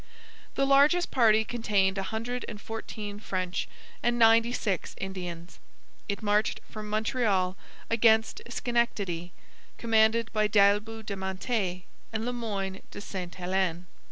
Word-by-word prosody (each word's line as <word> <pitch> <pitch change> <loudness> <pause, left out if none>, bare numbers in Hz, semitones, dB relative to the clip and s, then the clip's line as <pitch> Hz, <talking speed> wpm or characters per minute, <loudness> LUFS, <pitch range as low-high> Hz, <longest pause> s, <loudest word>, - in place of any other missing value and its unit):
The 275 - +2
largest 285 +6 +4
party 220 -3 +5
contained 205 -5 +1
a 195 - -1
hundred 240 +3 -3
and 210 -3 -7
fourteen 210 -1 -6
French 185 -3 -2 0.3
and 240 0 +1
ninety 230 0 +5
six 200 -7 -2
Indians. 180 -3 -6 0.5
It 200 +2 -3
marched 210 +1 +1
from 215 -1 -7
Montreal 215 -4 +1 0.3
against 220 -1 +3
Schenectady, 205 -8 -1 0.5
commanded 225 0 +3
by 215 -1 +3
D'Aillebout 210 +2 +3
de 200 - -3
Mantet 190 -1 -2 0.3
and 220 0 -2
Le 245 - -1
Moyne 200 -5 -3
de - - -9
Sainte 185 -3 -6
Helene. 180 -1 -1
215 Hz, 130 wpm, -28 LUFS, 190-230 Hz, 0.5 s, party